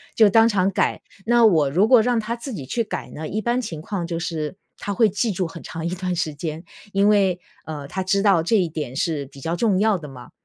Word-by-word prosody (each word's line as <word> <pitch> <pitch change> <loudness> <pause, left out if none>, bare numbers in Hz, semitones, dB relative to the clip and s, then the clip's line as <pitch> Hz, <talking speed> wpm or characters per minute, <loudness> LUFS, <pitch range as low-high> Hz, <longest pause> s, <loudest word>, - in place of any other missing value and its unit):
就 220 - +6
当 225 +2 +5
场 195 -2 +1
改。 - - 0 0.3
那 240 0 +5
我 160 -9 +4
如 185 +9 +3
果 245 -1 +7
让 240 +1 +1
他 225 +2 -3
自 240 +2 -7
己 150 -10 -6
去 230 - -1
改 - - -6
呢， 155 0 -6
一 215 - -2
般 240 +3 0
情 165 -10 -6
况 180 +1 -4
就 170 -1 -3
是， 165 -1 -3 0.2
他 205 - -4
会 220 +3 +4
记 210 +4 -1
住 185 -2 -2
很 165 - -10
长 165 0 -6
一 170 - 0
段 180 0 -2
时 160 -3 -1
间， 155 +2 -5 0.3
因 200 +1 +3
为， 195 -4 +3 0.3
呃， 150 -3 -6
他 190 +5 -3
知 195 +1 +1
道 195 -5 +4
这 220 +7 +2
一 185 -3 +2
点 150 -5 -5
是 150 -1 -1
比 140 0 -15
较 165 +5 -2
重 200 -1 +2
要 215 -1 +3
的 155 -4 -9
嘛， 125 -3 -12
185 Hz, 270 characters per minute, -22 LUFS, 160-215 Hz, 0.3 s, 果